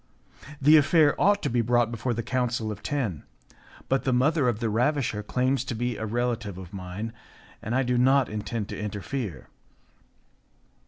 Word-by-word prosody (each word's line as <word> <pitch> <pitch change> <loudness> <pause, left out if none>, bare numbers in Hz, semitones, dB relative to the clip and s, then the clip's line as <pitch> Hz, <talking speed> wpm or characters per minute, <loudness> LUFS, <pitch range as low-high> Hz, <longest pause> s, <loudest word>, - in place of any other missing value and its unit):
The 150 +3 +7
affair 150 0 +4
ought 205 +2 +3
to - - 0
be 120 0 +2
brought 120 0 +2
before 120 +1 -2
the 115 - -3
Council 120 -2 -1
of 105 - -7
Ten, 115 - -2 0.7
but 135 0 +1
the 130 - +1
mother 135 +2 +3
of 115 -3 -2
the 115 - -1
ravisher 120 0 0
claims 130 +4 0
to 120 - -4
be 120 +1 -2
a 110 +1 -4
relative 120 -3 -2
of 95 -1 -10
mine, 95 +4 -6 0.5
and 115 +3 -3
I 135 - +3
do 125 0 +1
not 135 +1 +4
intend 105 0 -4
to - - -6
interfere." 105 - -4
120 Hz, 170 wpm, -26 LUFS, 105-130 Hz, 0.7 s, The